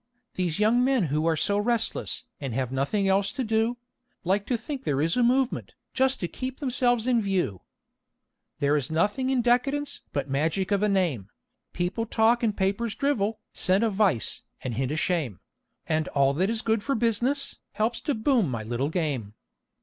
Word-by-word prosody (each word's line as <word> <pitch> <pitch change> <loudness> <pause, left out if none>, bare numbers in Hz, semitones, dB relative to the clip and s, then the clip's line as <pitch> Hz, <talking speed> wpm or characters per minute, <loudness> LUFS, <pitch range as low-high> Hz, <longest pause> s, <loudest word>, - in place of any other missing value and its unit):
These 175 -4 -1
young 225 +4 +3
men 260 -4 +3
who 155 +2 +1
are 160 -1 +2
so 200 +6 +1
restless, 230 +3 0 0.2
and 135 -5 -4
have 130 -1 -1
nothing 145 +10 0
else 195 +1 +2
to 265 - -2
do, 225 +1 +1 0.5
Like 195 +3 0
to 245 - +1
think 270 +4 -6
there 140 - 0
is 165 +3 +1
'a 250 - +2
movement,' 255 +2 +1 0.2
just 265 +1 +2
to 175 - 0
keep 260 +7 -5
themselves 245 -4 +1
in 245 -2 +3
view. 185 - -1 1.0
"There 145 +1 +2
is 140 -4 0
nothing 205 +11 +1
in 260 -3 +2
Decadence 275 +4 +1
but 140 -2 -1
the 135 - -10
magic 160 +8 0
of 200 -1 +2
a 210 - +2
name. 165 - 0 0.4
People 180 +6 -2
talk 225 +2 +3
and 220 -3 0
papers 200 +4 0
drivel, 225 -7 0
scent 190 +4 +3
a 225 - +2
vice, 190 - +1 0.2
and 125 - -3
hint 130 +4 -1
a 155 - -1
shame; 155 - -1 0.5
And 155 -1 0
all 140 -1 +2
that 185 +7 +1
is 225 -1 -1
good 225 -1 +1
for 275 +6 -1
business, 240 +5 0
helps 220 +3 -1
to 290 -3 -1
boom 225 - +2
my 115 -3 -3
little 120 +5 -2
game." 140 - -2
205 Hz, 190 wpm, -26 LUFS, 155-240 Hz, 1.0 s, young